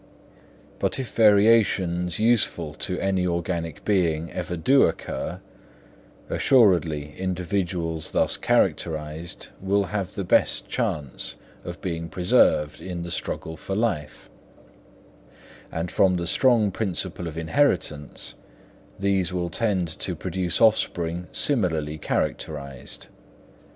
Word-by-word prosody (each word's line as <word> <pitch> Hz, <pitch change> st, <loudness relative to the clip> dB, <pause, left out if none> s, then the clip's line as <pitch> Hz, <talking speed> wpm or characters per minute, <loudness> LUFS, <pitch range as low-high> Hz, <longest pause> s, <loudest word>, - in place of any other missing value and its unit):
But -, -, 0 dB
if 130 Hz, -3 st, -5 dB
variations 100 Hz, -5 st, +4 dB
useful 105 Hz, -9 st, +2 dB
to 90 Hz, +3 st, -2 dB
any 95 Hz, -2 st, +1 dB
organic 85 Hz, -2 st, -3 dB
being 85 Hz, -5 st, +1 dB
ever 90 Hz, 0 st, -4 dB
do 135 Hz, +12 st, +4 dB
occur, 80 Hz, -, -4 dB, 0.9 s
assuredly 85 Hz, -, +3 dB
individuals 90 Hz, -3 st, -2 dB
thus -, -, +2 dB
characterised 80 Hz, +1 st, -1 dB
will 100 Hz, +1 st, +2 dB
have 100 Hz, -3 st, -3 dB
the 100 Hz, -, -2 dB
best 90 Hz, -, +2 dB
chance 70 Hz, -4 st, -3 dB, 0.3 s
of 85 Hz, 0 st, -7 dB
being 85 Hz, -3 st, -4 dB
preserved 75 Hz, -3 st, +3 dB
in 90 Hz, -2 st, -5 dB
the 85 Hz, -, -6 dB
struggle 80 Hz, 0 st, -4 dB
for 95 Hz, +5 st, -5 dB
life; 95 Hz, -10 st, -2 dB, 1.4 s
and 85 Hz, +1 st, -3 dB
from 95 Hz, -2 st, +3 dB
the 85 Hz, -1 st, -2 dB
strong 110 Hz, +2 st, +3 dB
principle 90 Hz, -3 st, -2 dB
of 80 Hz, -1 st, -7 dB
inheritance, 80 Hz, -, 0 dB, 0.6 s
these 95 Hz, -3 st, +1 dB
will 90 Hz, -1 st, -2 dB
tend 100 Hz, -6 st, 0 dB
to 90 Hz, -, -2 dB
produce 90 Hz, +1 st, -2 dB
offspring 90 Hz, -6 st, +2 dB
similarly 80 Hz, -, 0 dB
characterised. 70 Hz, -3 st, -3 dB
90 Hz, 110 wpm, -25 LUFS, 80-100 Hz, 1.4 s, variations